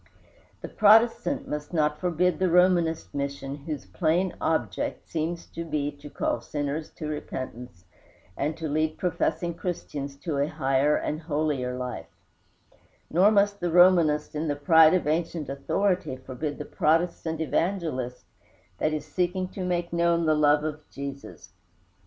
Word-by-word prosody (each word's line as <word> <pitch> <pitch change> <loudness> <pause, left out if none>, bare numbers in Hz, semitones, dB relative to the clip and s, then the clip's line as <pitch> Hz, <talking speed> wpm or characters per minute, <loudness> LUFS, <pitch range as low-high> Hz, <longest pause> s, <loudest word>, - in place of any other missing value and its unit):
The - - -5
Protestant 230 +6 +4
must 150 +2 -5
not 150 -2 +1
forbid 180 0 +1
the 185 -1 +2
Romanist 175 -2 +3
mission 140 0 -4
whose 150 -9 -4
plain 165 - 0
object 120 - -1
seems 165 +1 -3
to 165 - -5
be 150 -3 -2
to 145 - -11
call - - -1
sinners 145 +1 -3
to 155 - -6
repentance, 125 -9 -6 0.5
and 150 +3 -2
to 160 -1 -4
lead 155 +1 0
professing 175 -1 -1
Christians 150 -5 -5
to 155 -5 -2
a 140 - +2
higher 145 -1 +1
and 155 +2 -2
holier 145 -5 -1
life; 125 -11 -5 1.0
nor 185 +6 +5
must 205 -1 +2
the 175 - -1
Romanist 170 -4 +5
in 155 +1 -2
the 145 - 0
pride 160 +3 +6
of 185 - 0
ancient 160 -1 -1
authority 180 +3 0
forbid 135 +3 -5
the 150 - -6
Protestant 160 0 0
evangelist 160 -7 -1 0.6
that 155 - +1
is 155 -2 -3
seeking 185 0 -1
to 190 - -6
make 175 -1 -2
known 170 0 +2
the 155 - +4
love 150 -1 +3
of 155 0 -4
Jesus. 140 0 -8
155 Hz, 145 wpm, -26 LUFS, 145-175 Hz, 1.0 s, pride